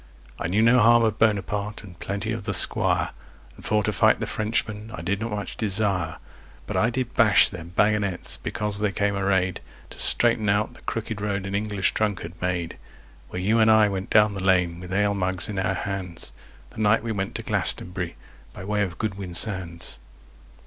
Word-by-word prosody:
I - - -2
knew 105 +5 +2
no 120 +2 +5
harm 120 +1 +5
of 110 -1 0
Bonaparte 105 -1 0
and 90 -4 -13
plenty 100 +3 -3
of 110 -3 -4
the 100 -3 +1
Squire, - - +2 0.4
And - - -15
for 105 -1 +1
to - - -1
fight - - +3
the - - -2
Frenchman 110 0 -3
I 85 - -8
did 100 +3 -1
not 115 - -2
much 105 -2 -5
desire; 95 -6 0 0.5
But - - -5
I 115 - +3
did 125 0 -3
bash 110 -4 +5
their 90 -4 -8
baggonets 100 +1 +1
because 105 -1 -2
they 105 -1 0
came 100 +1 0
arrayed 95 -2 0 0.3
To - - -11
straighten 115 -3 +4
out 105 +2 +1
the - - -16
crooked 110 -2 -4
road 100 -2 -2
an 95 - -5
English 100 -1 0
drunkard 100 -6 -2
made, 90 -2 -2 0.5
Where 90 - -5
you 110 +4 +2
and 110 0 +5
I 110 -1 +5
went 95 -1 -4
down 105 -1 +4
the 95 -1 -5
lane 90 -3 +2
with 90 0 -9
ale 100 +1 +2
mugs 95 -2 0
in 100 -2 -3
our 95 0 0
hands, 95 -3 -4 0.4
The - - -11
night 110 +1 +3
we 115 - -3
went 95 -2 -3
to - - -4
Glastonbury 90 -1 0 0.4
by - - -9
way 105 +1 0
of 90 -4 -2
Goodwin 95 -4 -4
Sands. 85 -3 -1
100 Hz, 195 wpm, -24 LUFS, 95-110 Hz, 0.5 s, no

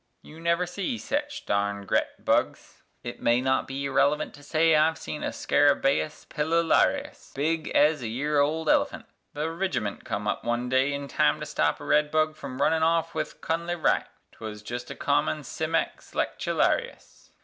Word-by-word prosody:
You 155 - -13
never 170 +2 +1
see 195 +7 -3
sech 290 +5 -2 0.2
darned 100 0 -1
gret - - -1
bugs - - 0 0.2
(it 120 - -7
may 120 +1 +3
not 130 +1 +1
be 135 +1 -4
irrelevant 145 +2 +1
To 145 - -14
say 155 +3 +3
I've 160 +1 +3
seen 150 - -6
a - - -1
_scarabæus 145 +1 +1
pilularius_[A] 165 +2 0
big 155 +3 -1
ez 150 -1 +4
a 120 - -3
year 145 +6 0
old 155 +3 +1
elephant), - - +2 0.3
The 150 +2 -2
rigiment 165 - -2
come 105 0 -3
up 105 - -1
one 120 +1 -1
day 130 +2 +2
in 140 0 -4
time - - +2
to - - -5
stop 75 0 0
a - - -9
red 150 0 +3
bug 155 0 +1
From 135 -4 -8
runnin' 160 0 +2
off 165 0 +2
with - - -4
Cunnle 170 +2 -2
Wright - - +2 0.2
'twuz 105 -1 -8
jest 120 +2 -6
a - - -6
common 150 -2 0
cimex 160 +3 -3
lectularius. 485 0 -1
150 Hz, 170 wpm, -26 LUFS, 130-165 Hz, 0.3 s, ez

